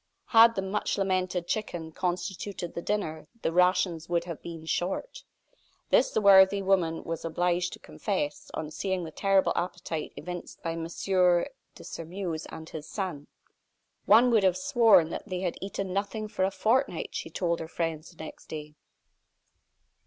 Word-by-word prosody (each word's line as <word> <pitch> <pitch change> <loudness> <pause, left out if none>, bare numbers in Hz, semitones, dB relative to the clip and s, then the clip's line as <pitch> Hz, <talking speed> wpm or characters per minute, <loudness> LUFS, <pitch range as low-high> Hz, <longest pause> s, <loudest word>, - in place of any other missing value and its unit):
Had 230 0 +7
the 195 - -1
much 195 +2 -1
lamented 185 -2 0
chicken 175 -5 -3
constituted 180 +1 -3
the 170 - -4
dinner 160 -7 -2 0.2
the - - +1
rations 180 -2 +2
would 170 -1 +1
have 170 -3 -7
been 165 -2 -8
"short." 195 - -2 0.7
This 260 - +5
the - - 0
worthy 195 0 +7
woman 180 -4 +1
was 165 -1 -4
obliged 175 +2 0
to - - -9
confess, 165 -8 -3
on 155 -1 -4
seeing 190 +1 -2
the 160 - -6
terrible 195 +3 +2
appetite 175 -3 -3
evinced 175 +2 -7
by 165 - -1
M. 165 0 -4
de 180 +8 0
Sairmeuse 165 -1 -5
and 160 - -9
his 155 -1 -7
son. 180 -8 -4 0.8
"One 245 +2 +7
would 225 -3 +5
have 185 -1 +3
sworn 190 -3 +5
that - - -5
they 185 -2 -3
had 180 -2 -2
eaten 195 -1 -4
nothing 205 +2 -2
for 205 -3 0
a - - +1
fortnight," 235 +7 +1
she - - -5
told 170 -2 -1
her 160 - -5
friends, 165 -1 -3
the 165 -2 -10
next 155 - -10
day. 150 -1 -7
180 Hz, 160 wpm, -28 LUFS, 165-195 Hz, 0.8 s, Had